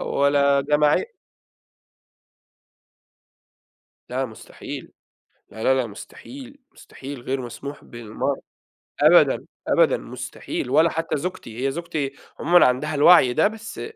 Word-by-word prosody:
ولا 140 0 +2
جماعية 150 - +1 3.0
لا 130 +2 -2
مستحيل، 110 -2 -10 0.6
لا، 110 +1 -8
لا، 130 - +4
لا 130 -3 0
مستحيل، 265 - -12
مستحيل 135 -1 -10
غير 130 +1 -3
مسموح 140 +4 -8
بالمَرّة، 115 -2 -4 0.6
أبدًا، - - +5 0.2
أبدًا - - +3
مستحيل، - - -6
ولا 160 +5 +4
حتّى 165 -2 -2
زوجتي، 135 -8 -5
هي - - 0
زوجتي 155 -3 -4 0.3
عمومًا 175 +1 +5
عندها 130 +5 0
الوعي 145 -4 +6
ده 160 - +3
بس، 220 +1 -8
140 Hz, 110 wpm, -23 LUFS, 130-165 Hz, 3.0 s, الوعي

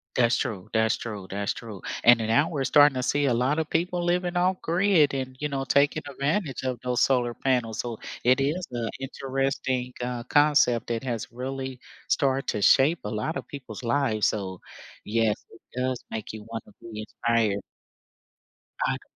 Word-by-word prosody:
That's 120 -1 +4
true, 110 -9 -3
that's 110 -1 +2
true, 105 -5 -6
that's 100 0 -2
true. 110 -5 -9 0.2
And 120 0 +7
then 110 - -2
now 145 +8 +3
we're 145 -4 -2
starting 145 +1 +6
to 125 - -1
see 145 +3 +1
a 130 - +3
lot 130 +6 +1
of 160 - -2
people 175 +1 0
living 175 0 0
off 180 +1 +2
grid 170 -4 +3
and, 130 -1 -3
you 150 - -1
know, 135 -2 -2
taking 140 +4 +2
advantage 140 +2 -1
of 130 -2 -2
those 125 -1 0
solar 125 -3 +2
panels, 120 -5 0
so 120 -3 -3 0.2
it 130 +2 +4
is 160 +6 0
a 115 -2 -2
interesting, 135 -1 -2
uh, 125 -1 -3
concept 145 -4 +3
that 115 0 -2
has 120 -5 -4
really 130 +1 -5 0.3
start 135 -1 +1
to 105 - -1
shape 150 +5 +5
a 105 - -3
lot 110 +10 -2
of - - -7
people's 125 -5 -8
lives, 115 -3 +2
so 95 -3 -3 0.5
yes, 110 0 +2 0.2
it 115 - -16 0.2
does 130 -1 -1
make 110 -2 -5
you 110 -1 -8
wanna 115 -2 -6
be 110 -2 -7
inspired. 110 -2 0 1.2
I - - +1
c - - -23
130 Hz, 180 wpm, -26 LUFS, 115-145 Hz, 1.2 s, And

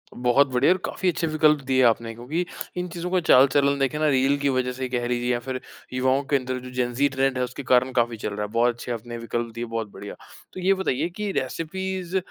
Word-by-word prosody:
बहुत 125 +3 +3
बढ़िया 125 +7 +4
और - - -3
काफ़ी 185 - -1
अच्छे 165 -1 -1
विकल्प 155 -1 +3
दिए 130 0 +2
आपने 115 -1 +2
क्योंकि 145 +10 -3 0.3
इन 180 0 -2
चीज़ों 175 +1 -4
का 185 - +3
चाल-चलन 140 +2 +5
देखें 135 +2 0
ना 155 - +2
रील 135 +1 +3
की 140 0 +1
वज़ह 130 -1 0
से 130 0 -4
कह 120 -1 -1
लिजिए 120 0 0
या 120 - +1
फिर 130 +1 -4 0.3
युवाओं 130 +2 +2
के - - +4
अंदर 130 -1 -1
जो 125 0 -10
जेनजी 125 +3 +1
ट्रेंड 135 -1 +1
है 125 - +1
उसके 125 +3 -5
कारण 125 +1 +3
काफ़ी 120 -2 +1
चल 105 - -3
रहा 105 +1 -2
है, 105 - -10
बहुत 120 +1 +3
अच्छे 120 +1 -7
आपने 120 +1 -5
विकल्प 115 0 -3
दिए 120 +1 -3
बहुत 115 -1 -3
बढ़िया। 100 - -8 0.4
तो 185 - -7
ये 195 +2 +4
बताइए 175 -4 -1
कि 210 -2 -2
रेसिपीज़ 185 +5 -3
130 Hz, 235 wpm, -24 LUFS, 120-150 Hz, 0.4 s, चाल-चलन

